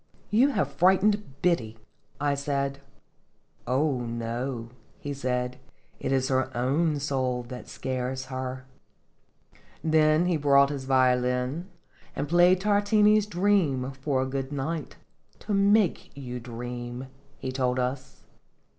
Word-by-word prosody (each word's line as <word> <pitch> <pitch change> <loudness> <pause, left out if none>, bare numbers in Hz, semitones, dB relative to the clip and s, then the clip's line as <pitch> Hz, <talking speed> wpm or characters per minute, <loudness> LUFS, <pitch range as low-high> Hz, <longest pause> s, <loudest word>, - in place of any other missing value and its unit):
" - - -33
You 235 +6 +5
have 145 - 0
frightened 190 -1 +2
Biddy," 120 -11 +1 0.4
I 145 0 +1
said. 140 -1 -2 0.9
"Oh, 135 +1 +1
no," 120 +1 -4 0.3
he 145 - -4
said, 125 -2 -2 0.4
"it - - -2
is 130 -1 +1
her 130 -1 +1
own 145 +5 +1
soul 130 -3 -1
that 125 -1 -8
scares 130 0 -3
her." 130 0 -5 1.2
Then 155 +1 +4
he 175 -2 +1
brought 140 -1 +4
his 135 -2 -5
violin, 125 +4 +1 0.5
and 145 - -2
played 175 +3 +5
Tar 205 0 +3
tini's 210 0 +4
"Dream" 175 -10 +1
for 130 0 -1
a - - -2
good 135 +1 -4
night 145 +1 -3 0.4
"to 210 - -4
make 200 -1 +3
you 125 -3 -6
dream," 120 +1 -6 0.3
he 130 - -4
told 130 -1 0
us. 130 +1 -3
135 Hz, 130 wpm, -27 LUFS, 125-165 Hz, 1.2 s, You